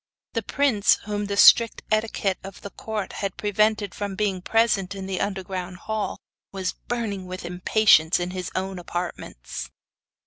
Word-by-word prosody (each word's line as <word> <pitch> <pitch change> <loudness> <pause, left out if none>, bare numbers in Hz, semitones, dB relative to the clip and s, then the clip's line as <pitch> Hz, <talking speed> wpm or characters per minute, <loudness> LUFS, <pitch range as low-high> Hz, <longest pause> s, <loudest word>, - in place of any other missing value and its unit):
The 230 - 0
prince, 230 -3 +3
whom 205 0 -2
the 200 0 -3
strict 230 +2 +7
etiquette 215 -3 0
of 195 -1 -9
the 200 - -8
court 215 -3 -5
had 195 -2 -4
prevented 210 -1 +1
from 200 -2 -4
being 195 -3 -1
present 200 -3 +1
in 195 -1 -6
the 190 -1 -2
underground 190 -2 -3
hall, 215 +3 -3 0.3
was 190 -1 -2
burning 210 -6 -4
with 185 -1 -6
impatience 180 -2 +4
in 175 +1 -2
his 185 -1 -4
own 190 0 -2
apartments. 170 - -5
195 Hz, 150 wpm, -24 LUFS, 185-215 Hz, 0.3 s, strict